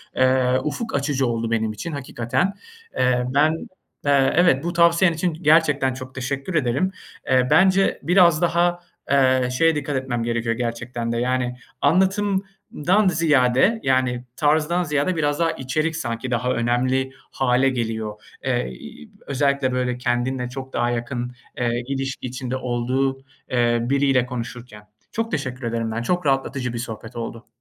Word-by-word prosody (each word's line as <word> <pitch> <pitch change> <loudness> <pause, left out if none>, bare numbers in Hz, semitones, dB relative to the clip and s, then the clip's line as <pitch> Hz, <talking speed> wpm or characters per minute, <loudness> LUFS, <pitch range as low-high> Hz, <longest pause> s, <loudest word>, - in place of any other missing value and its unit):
eee, 130 0 +3
ufuk 225 - -3
açıcı 140 -2 0
oldu 115 -1 -2
benim 110 -1 0
için 110 +10 -6
hakikaten. 130 - -1 0.4
Eee, 125 -1 +2
ben, 150 +3 +4 0.5
eee, 140 -2 +3
evet, 170 -5 +4
bu 175 +1 -2
tavsiyen 170 +1 +4
için 165 +1 -1
gerçekten 150 -4 +3
çok 130 0 -9
teşekkür 135 +6 -3
ederim. 140 +6 +1 0.4
Eee, 130 -1 +3
bence 190 +1 +4
biraz 175 -2 +5
daha, 175 0 +2 0.3
eee, 130 -2 +3
şeye 165 +2 +4
dikkat 145 -1 -2
etmem 125 -3 -2
gerekiyor 115 0 -1
gerçekten 120 0 -3
de, 115 - -1
yani, 125 0 -1 0.2
anlatımdan 190 +1 +1
ziyade, 155 - +3
yani, 130 -2 +1
tarzdan 155 +5 +2
ziyade 150 +3 0
biraz 145 -2 0
daha 165 -1 +2
içerik 155 +4 -2
sanki 120 -4 -4
daha 125 +1 0
önemli 130 +3 0 0.2
hâle 130 0 +2
geliyor. 110 -4 -3 0.2
Eee, - - 0
ııı, 75 +4 -11 0.2
özellikle 140 -1 +1
böyle 125 -1 -1
kendinle 125 0 -1
çok 130 +1 -8
daha 120 0 +1
yakın, 120 +1 -3 0.3
eee, 120 0 -1
ilişki 135 -1 -3
içinde 130 0 -4
olduğu, 130 +2 -1 0.3
eee, 120 -1 +2
biriyle 135 0 +2
konuşurken. 120 -3 -7 0.3
Çok 225 0 -2
teşekkür 130 -4 -3
ederim 115 -1 -2
ben, 110 +1 -2
çok 175 +7 -1
rahatlatıcı 135 -2 0
bir - - -4
sohbet 115 0 -7
oldu. 115 0 -6
130 Hz, 145 wpm, -22 LUFS, 120-155 Hz, 0.5 s, biraz